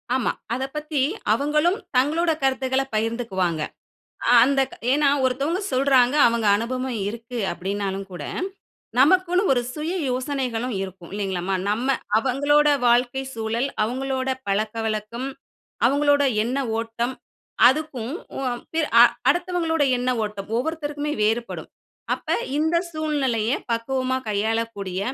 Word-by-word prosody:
ஆமா. 260 - +1 0.2
அத 255 +2 -2
பத்தி 300 -2 -1 0.3
அவங்களும் 300 +6 +2 0.2
தங்களோட 320 +6 +2
கருத்துக்கள 265 0 +1
பகிர்ந்துக்குவாங்க. 215 -7 -1 0.7
அ - - +6
அந்த 270 +2 +3 0.3
ஏன்னா 285 +1 +4
ஒருத்தவங்க 275 +8 0
சொல்றாங்க 260 0 +4
அவங்க 230 -1 0
அனுபவம் 255 +3 -2
இருக்கு 235 +2 -7
அப்டின்னாலும் 195 +1 -3
கூட, 175 - -7 0.8
நமக்குன்னு 365 +5 +4
ஒரு 245 - +1
சுய 315 +3 -3 0.2
யோசனைகளும் 255 -2 -2
இருக்கும் 185 -3 -8
இல்லைங்களாம்மா. 190 -2 -2
நம்ம 250 +6 +1 0.2
அவங்களோட 285 +5 +3 0.2
வாழ்க்கை 245 +2 +2
சூழல், 225 +3 -1 0.2
அவங்களோட 260 +3 -2 0.2
பழக்கவழக்கம், 215 +3 -2 0.6
அவங்களோட 285 +2 +3 0.2
எண்ண 245 +4 -2 0.2
ஓட்டம் 230 +2 -2 0.5
அதுக்கும் 265 -3 -1 0.2
உ - - -3
அ - - -1 0.2
பி 325 - +1 0.2
அ - - +11 0.3
அடுத்தவங்களோட 350 -3 +1
எண்ண 250 +1 -1
ஓட்டம், 210 -2 -5
ஒவ்வொருத்தருக்குமே 295 +1 -2
வேறுபடும். 230 +2 -1 0.4
அப்ப - - -7 0.3
இந்த 320 +2 +1 0.2
சூழ்நிலைய 275 -8 0 0.2
பக்குவமா 260 +3 0
கையாளக்கூடிய, 210 -2 -1
255 Hz, 110 wpm, -23 LUFS, 225-285 Hz, 0.8 s, அ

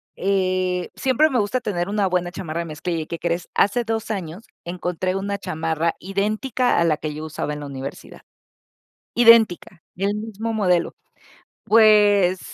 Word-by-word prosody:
eh, 185 -2 0
siempre 270 +4 +2
me 255 -4 +1
gusta 210 +5 -1
tener 180 -5 -2
una 205 -1 +1
buena 180 -1 -1
chamarra 165 -3 -5
de - - -5
mezclilla. 165 +2 -4
¿Y - - -15
qué 170 - -5
crees? 170 0 -2
Hace 220 +4 +2
2 225 0 -3
años 190 +1 -6 0.2
encontré 180 +1 -3
una 200 +1 -2
chamarra 160 -1 -2
idéntica 215 +6 0
a - - +3
la 155 -2 +2
que 155 -1 -5
yo 155 +1 -6
usaba 155 -1 -4
en 150 - -7
la - - -6
universidad. 135 0 -8 0.9
Idéntica, 225 -7 +4
el 200 +3 0
mismo 220 +1 -4
modelo. 180 -5 +1 0.7
Pues, 205 -4 +5
185 Hz, 160 wpm, -22 LUFS, 170-215 Hz, 0.9 s, Pues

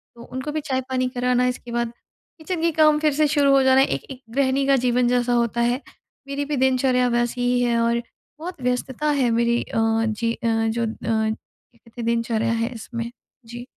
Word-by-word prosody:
तो 235 - -13
उनको 260 +5 -5
भी 310 0 -2
चाय-पानी 260 -2 -1
कराना 250 0 +1
इसके 245 -1 -4
बाद 235 -1 -1 0.5
किचन 330 +1 -4
के 335 0 +2
काम 305 -1 +4
फिर 305 -2 +2
से 305 +1 +3
शुरू 285 -1 +3
हो 275 -1 +5
जाना 265 0 +5
है - - +3
एक - - -3
एक 260 0 -9
गृहिणी 275 0 +2
का 275 - +5
जीवन 245 0 +2
जैसा 245 0 +1
होता 235 0 +1
है 245 +3 +1 0.5
मेरी 280 +1 -3
भी 295 0 -2
दिनचर्या 255 -1 +2
वैसी 240 +1 0
ही 245 0 +2
है। 235 -1 +2
और 235 0 +1 0.4
बहुत 345 -3 -7
व्यस्तता 250 +4 -1
है 245 - +3
मेरी 235 +1 +2
अ, - - -6 0.3
जी 230 +1 -1
अ, 235 - -4
जो 225 +1 0
अ, - - -2 0.2
क्या 220 +1 -3
कहते 230 +1 -11
है - - -4
दिनचर्या 230 -1 0
है 230 +2 -1
इसमें। 235 +1 -6 0.3
जी। 240 +2 -8
245 Hz, 205 wpm, -23 LUFS, 235-270 Hz, 0.5 s, हो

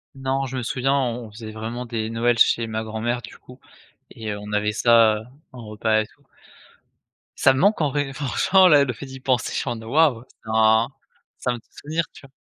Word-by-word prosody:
Non, 135 +1 -2
je 130 0 -5
me 125 - -3
souviens. 135 +2 0
On 125 -3 -1
on 105 - -15
faisait 110 0 -9
vraiment 115 +3 -5
des 115 -2 -3
Noëls 115 +1 +1
chez 115 0 +3
ma 110 0 -3
grand-mère, 110 +2 -3
du - - -12
coup 125 +1 -16 0.5
et 110 -2 -5
heu, - - -6
on 105 0 -9
avait 105 0 0
ça, 115 -1 +5
heu, - - -10 0.3
en 120 -3 -10
repas 110 +1 +1
et 110 - -4
tout. - - -28 1.2
Ça 130 - +5
me 130 - -2
manque, 200 +2 +3
en 150 - +2
vrai, 145 -1 -2
franchement, 180 +7 +3
là, 145 -4 +6
le 130 -3 -2
fait 140 - -9
d'y 135 0 -10
penser, 130 -3 0
je - - -2
suis 130 - -3
en 120 - -2
mode 110 0 -9
«waouh». 140 -5 +3 0.2
C'est 110 - -11 0.2
un 110 +1 +3 0.5
ça 125 - -1
me - - -5
fait - - -32
souvenir, 160 +3 -3
tu - - -14
vois? - - -30
120 Hz, 235 wpm, -23 LUFS, 110-135 Hz, 1.2 s, là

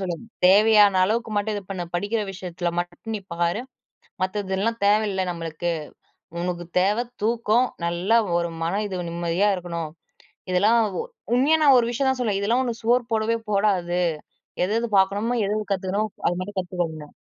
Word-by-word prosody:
சொல்லுவேன். 180 +1 -4 0.2
தேவையான 205 0 +6
அளவுக்கு 225 +3 -1
மட்டும் 210 +1 0
இது 205 - -5
பண்ணு! 185 -3 -3
படிக்கிற 205 +5 0
விஷயத்தில 180 -2 -4
மட்டும் 175 +6 -4
நீ - - -6
பாரு! 170 +4 0 0.6
மத்ததெல்லாம் 200 +3 -1
தேவையில்ல 205 -2 +2
நம்மளுக்கு. 170 0 -3 0.7
உனக்கு 175 -1 -3
தேவை 205 +6 +2 0.2
தூக்கம். 230 +2 +2 0.2
நல்லா 175 +6 +2 0.2
ஒரு 170 0 -1
மனம் 200 +6 -1
இது 185 -3 -4
நிம்மதியா 170 +4 +1
இருக்கணும். 170 -3 -5 0.6
இதெல்லாம் 210 +6 +4 0.2
உ - - -1 0.3
உண்மையா 280 +6 +4
நான் 280 -3 +7
ஒரு 235 - +2
விஷயம் 265 +3 0
தான் 260 -1 -2
சொல்லுவேன். 210 -5 0
இதெல்லாம் 230 +6 +2
உனக்கு 235 -2 -4
சோறு 245 +2 +3
போடவே 225 +1 +1
போடாது. 190 -4 +1 0.6
எது, 190 - -1
எது 235 - -2
பார்க்கணுமோ! 205 +5 +1
எது 205 - 0
எது 210 -1 -6
கத்துக்கணுமோ 195 +3 -1 0.2
அது 175 - -2
மட்டும் 195 +1 -5
கத்துக்க 180 -1 -2
உன்ன. 150 -2 -11
200 Hz, 160 wpm, -24 LUFS, 175-225 Hz, 0.7 s, நான்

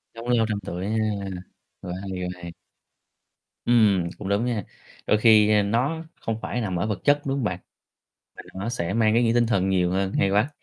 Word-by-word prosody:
Sống 115 +1 -8
lâu 115 -2 +3
trăm 105 -1 -1
tuổi 90 +2 -4
ha, 110 - -1 0.9
quá 90 -1 -6
hay, 95 - -6
quá 90 - -2
hay. 85 -1 -7 1.1
Ừm, 105 -7 +3
cũng 100 - -6
đúng 100 +4 +1
nha, 115 -6 -1 0.4
đôi 105 - +4
khi, 110 -1 +6
a, 105 -1 +4
nó 130 +10 0 0.2
không 115 -1 -3
phải 125 - -3
nằm 95 -5 -2
ở 100 - -1
vật 105 -4 -2
chất, 145 0 +3
đúng 135 0 -1
hông 135 - -2
bạn? 95 -4 -2 0.8
Mà - - -9
nó 95 +4 -4
sẽ 90 -6 -2
mang 110 -1 +3
ý 120 - +4
nghĩa 115 -1 +2
tinh 120 0 +3
thần 95 -4 +1
nhiều 90 -2 +2
hơn, 95 0 -1
hay 100 - +2
quá. 105 +8 +2
105 Hz, 215 wpm, -24 LUFS, 95-115 Hz, 1.1 s, khi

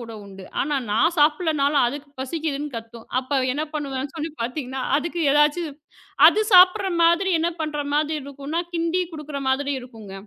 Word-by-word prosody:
கூட 230 -1 -8
உண்டு. 195 -1 -12 0.2
ஆனா 290 +2 -1
நான் 285 +12 +2
சாப்பிடலன்னாலும் 300 -2 +2
அதுக்குப் 280 +3 -5
பசிக்குதுன்னு 295 +1 -3
கத்தும். 230 0 -9
அப்ப 265 +2 -1
என்ன 295 +3 -2
பண்ணுவேன் 275 -2 -3
சொல்லி 320 0 -4
பாத்தீங்கன்னா, 260 +1 -4
அதுக்கு 340 +3 -3
எதாச்சும் 295 +1 +1 0.5
அது 430 - +5
சாப்புடுற 375 +2 +7
மாதிரி 340 +3 +3
என்ன 330 +2 +1
பண்ற 305 -1 -3
மாதிரி 305 +1 +1
இருக்கும்னா? 280 +4 -4
கிண்டிக் 340 +1 -1
குடுக்கற 300 -2 -6
மாதிரி 280 +2 0
இருக்குங்க. 225 -6 -12
295 Hz, 150 wpm, -23 LUFS, 265-325 Hz, 0.5 s, சாப்புடுற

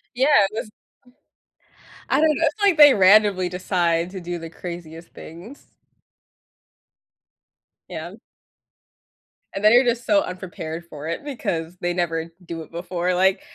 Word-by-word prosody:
Yeah, 260 +3 +2 0.2
it - - -31
was 220 - -4
mm, - - -19 1.4
I - - +2
don't 315 - +4
know, - - -4
it's 410 +8 -3
like 395 -5 +4
they 290 -3 +8
randomly 195 -1 +4
decide 175 -1 -1
to 190 -1 -8
do 175 0 -5
the 165 -1 -9
craziest 170 -1 -9
things. 180 - -12 2.2
Yeah. - - -7 1.4
And 195 - -5
then 215 +2 +6
you're 245 +2 +6
just 240 0 -1
so 300 -1 +3
unprepared 175 - -7
for 155 -2 -9
it 165 +11 -4
because 180 - -4
they 175 0 -1
never 165 -2 -2
do 165 0 -6
it 160 - -13
before, 175 +1 -3
like, 190 +2 +2
180 Hz, 145 wpm, -22 LUFS, 170-215 Hz, 2.2 s, they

